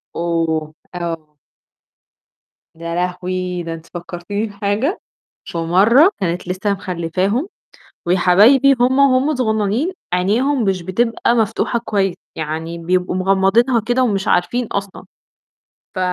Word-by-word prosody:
أوه! 165 Hz, -2 st, -1 dB, 0.2 s
آه. 165 Hz, -3 st, -5 dB, 1.4 s
يا 170 Hz, +1 st, -5 dB
لهوي! 180 Hz, 0 st, -2 dB
ده 165 Hz, 0 st, -5 dB
أنتِ 165 Hz, 0 st, -10 dB
فكّرتيني 175 Hz, +4 st, -4 dB
بحاجة، 205 Hz, -, -2 dB, 0.5 s
فمرة 195 Hz, -, +4 dB
كانت 175 Hz, 0 st, -2 dB
لسّه 185 Hz, +3 st, -1 dB
مخلّفاهم 190 Hz, -, -2 dB, 0.6 s
وياحبايبي 205 Hz, +10 st, +5 dB
وهُم 255 Hz, +2 st, +3 dB
وهم 275 Hz, +2 st, +3 dB
صغنانين 220 Hz, -, 0 dB, 0.2 s
عينيهم 230 Hz, +9 st, +1 dB
مش 190 Hz, -3 st, 0 dB
بتبقى 230 Hz, +6 st, 0 dB
مفتوحة 230 Hz, +1 st, 0 dB
كويس، 195 Hz, -5 st, -1 dB, 0.2 s
يعني 160 Hz, +2 st, -4 dB
بيبقوا 180 Hz, +2 st, -1 dB
مغمّضينها 195 Hz, +6 st, +3 dB
كده 245 Hz, +4 st, 0 dB
ومش 200 Hz, -6 st, 0 dB
عارفين 240 Hz, +7 st, +1 dB
أصلًا. 200 Hz, -2 st, -5 dB, 0.9 s
ف -, -, -5 dB
190 Hz, 110 wpm, -18 LUFS, 175-235 Hz, 1.4 s, وياحبايبي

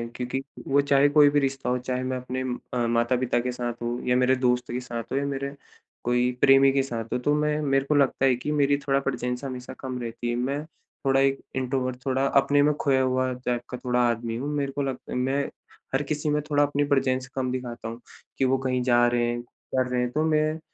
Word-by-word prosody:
क्योंकि 125 Hz, +2 st, -3 dB, 0.3 s
वो 140 Hz, +1 st, +4 dB
चाहे 140 Hz, 0 st, +4 dB
कोई 145 Hz, 0 st, +6 dB
भी 145 Hz, 0 st, +3 dB
रिश्ता 135 Hz, -2 st, -1 dB
हो, 125 Hz, -, +1 dB
चाहे 125 Hz, 0 st, -3 dB
मैं 130 Hz, 0 st, -2 dB
अपने 125 Hz, +1 st, -4 dB, 0.3 s
अ, 120 Hz, -1 st, +1 dB
माता-पिता 120 Hz, +1 st, +1 dB
के 125 Hz, +1 st, -2 dB
साथ 120 Hz, -1 st, -3 dB
हो 120 Hz, +1 st, -2 dB
या 125 Hz, -, +3 dB
मेरे 130 Hz, +1 st, +4 dB
दोस्त 125 Hz, -1 st, 0 dB
के 125 Hz, -, -2 dB
साथ 120 Hz, -2 st, -5 dB
हो 135 Hz, -, 0 dB
या 140 Hz, -, 0 dB
मेरे 140 Hz, 0 st, -3 dB, 0.5 s
कोई 125 Hz, +1 st, +2 dB
प्रेमी 135 Hz, 0 st, +6 dB
के 135 Hz, 0 st, +2 dB
साथ 115 Hz, -4 st, -4 dB
हो -, -, +2 dB
तो 145 Hz, +4 st, +1 dB
मैं 150 Hz, 0 st, +1 dB
मेरे 135 Hz, -1 st, +1 dB
को 150 Hz, +1 st, +1 dB
लगता 135 Hz, -1 st, +3 dB
है 130 Hz, -2 st, +4 dB
कि 135 Hz, +5 st, -4 dB
मेरी 145 Hz, -1 st, +3 dB
थोड़ा 135 Hz, 0 st, +3 dB
प्रेज़ेंस 125 Hz, -1 st, -3 dB
हमेशा 125 Hz, -2 st, -6 dB
कम 130 Hz, -1 st, -5 dB
रहती 120 Hz, 0 st, -4 dB
है 120 Hz, -, 0 dB
मैं 135 Hz, +4 st, -1 dB, 0.4 s
थोड़ा 135 Hz, 0 st, +4 dB
एक 135 Hz, 0 st, +2 dB, 0.2 s
इंट्रोवर्ट 130 Hz, -1 st, -2 dB
थोड़ा 135 Hz, 0 st, +1 dB
अपने 140 Hz, +1 st, +3 dB
में 150 Hz, +1 st, +3 dB
खोया 135 Hz, -2 st, +3 dB
हुआ 130 Hz, 0 st, +1 dB
टाइप 125 Hz, -1 st, -2 dB
का 125 Hz, -, -5 dB
थोड़ा 125 Hz, -1 st, -1 dB
आदमी 115 Hz, 0 st, -2 dB
हूँ। 140 Hz, +4 st, -3 dB
मेरे 140 Hz, -1 st, -1 dB
को 140 Hz, -, -3 dB
लगत 135 Hz, -2 st, -5 dB
मैं 135 Hz, +3 st, +1 dB, 0.5 s
हर 135 Hz, -, +1 dB
किसी 150 Hz, +1 st, -2 dB
में 150 Hz, 0 st, +1 dB
थोड़ा 145 Hz, -1 st, +3 dB
अपनी 145 Hz, 0 st, +1 dB
प्रेज़ेंस 130 Hz, -2 st, +1 dB
कम 130 Hz, -1 st, -1 dB
दिखाता 125 Hz, -3 st, -5 dB
हूँ, 115 Hz, +1 st, -6 dB, 0.4 s
कि 135 Hz, -, +2 dB
वो 130 Hz, +1 st, +3 dB
कहीं 130 Hz, -1 st, -1 dB
जा 120 Hz, -1 st, +4 dB
रहे 120 Hz, 0 st, +1 dB
हैं, 120 Hz, 0 st, -2 dB
कर 130 Hz, +1 st, -3 dB
रहे 125 Hz, 0 st, 0 dB
हैं 125 Hz, -, 0 dB
तो 155 Hz, +4 st, 0 dB
मैं 155 Hz, 0 st, +1 dB
130 Hz, 230 wpm, -26 LUFS, 125-140 Hz, 0.5 s, कोई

